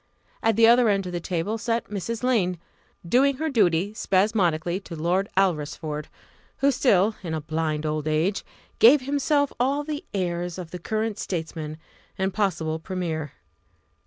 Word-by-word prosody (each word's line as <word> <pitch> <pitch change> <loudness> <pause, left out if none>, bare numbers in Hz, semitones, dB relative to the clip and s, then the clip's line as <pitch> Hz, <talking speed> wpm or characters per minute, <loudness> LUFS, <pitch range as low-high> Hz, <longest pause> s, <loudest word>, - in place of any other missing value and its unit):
At 225 -1 +2
the 225 +1 +6
other 235 0 +6
end 195 -2 +1
of 180 - -5
the 175 - -2
table 180 +6 -2
sat 230 +1 -1
Mrs. 220 +4 -4
Lane, 200 -8 +1 0.5
doing 270 +8 +4
her 315 +1 -2
duty 195 -4 +2
spasmodically 185 -5 +1
to 185 -4 -9
Lord 175 +5 0
Alresford, 155 -4 -1 0.5
who 280 +1 +3
still, 215 -5 +3
in 165 -4 -3
a 155 - -3
blind 155 0 -2
old 155 0 -2
age, 160 +6 0 0.4
gave 260 +5 +7
himself 285 +1 +1
all 275 +4 +1
the 295 0 -4
airs 175 -2 -2
of 175 -3 -7
the 180 - -6
current 220 +3 -2
statesman 160 -3 -4 0.4
and 190 -1 -1
possible 160 -6 -1
premier. 160 -5 -4
190 Hz, 155 wpm, -25 LUFS, 165-225 Hz, 0.5 s, gave